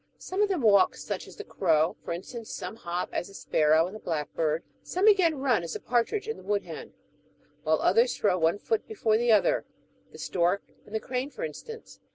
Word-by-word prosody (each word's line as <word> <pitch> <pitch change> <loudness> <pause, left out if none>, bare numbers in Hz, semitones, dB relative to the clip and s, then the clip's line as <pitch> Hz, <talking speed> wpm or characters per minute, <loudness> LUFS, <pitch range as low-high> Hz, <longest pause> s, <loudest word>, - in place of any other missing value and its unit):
Some 375 +2 -3
of 415 - +3
them 370 -6 0
walk, 200 -3 +5
such - - -5
as - - -12
the 425 - -7
crow, 160 - +1
for - - -5
instance; 220 +7 -6
some - - -5
hop, 175 -3 -3
as - - -2
the 195 - -14
sparrow 155 +1 +3
and 185 +4 -7
the - - -7
blackbird; 155 -1 -1 0.2
some, 370 +3 -1
again, 375 -7 +5
run, 260 -7 +2
as 170 - -5
the - - -4
partridge 250 - 0
and 450 - -4
the - - -13
woodhen; 200 -6 -3 0.7
while 155 +1 +2
others 230 +6 +3
throw 185 -3 +2
one 165 +4 +2
foot 445 - -1
before 310 - +1
the 240 0 +2
other, 210 -2 +4 0.5
the - - -12
stork 180 +2 0 0.2
and 210 - -7
the - - +1
crane, 255 +4 -3
for 485 - -7
instance. 465 -1 -8
215 Hz, 205 wpm, -28 LUFS, -, 0.7 s, walk